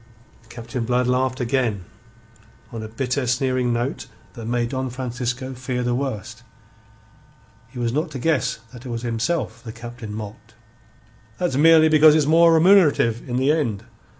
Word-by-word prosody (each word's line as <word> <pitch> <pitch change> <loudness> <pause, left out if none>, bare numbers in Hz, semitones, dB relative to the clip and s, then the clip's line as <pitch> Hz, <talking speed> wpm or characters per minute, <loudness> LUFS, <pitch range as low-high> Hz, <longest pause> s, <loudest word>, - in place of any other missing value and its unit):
Captain 120 +1 -5
Blood 125 +2 +1
laughed 130 +1 0
again, 120 -6 -1 0.9
on 115 - -6
a 110 - -6
bitter, 125 +3 -2
sneering 125 0 0
note 120 +3 -3 0.3
that 115 -3 -8
made 120 0 -1
Don 130 0 -3
Francisco 125 +1 -4
fear 125 0 -4
the 120 0 0
worst. 125 -6 -4 1.3
He 125 - -14
was 120 -1 -1
not 155 +4 -1
to 140 - -7
guess 140 -5 0
that 120 -1 -11
it 130 - -8
was 115 0 -4
himself 120 +1 -2
the 115 - -7
Captain 120 -1 -9
mocked. 110 +1 -9 0.8
"That's 175 -7 -1
merely 160 +2 +6
because 155 -1 +6
it's 155 -2 +3
more 165 +2 +5
remunerative 160 - +4
in 120 - -2
the 135 +3 +2
end. 120 -10 -1
125 Hz, 155 wpm, -22 LUFS, 115-140 Hz, 1.3 s, merely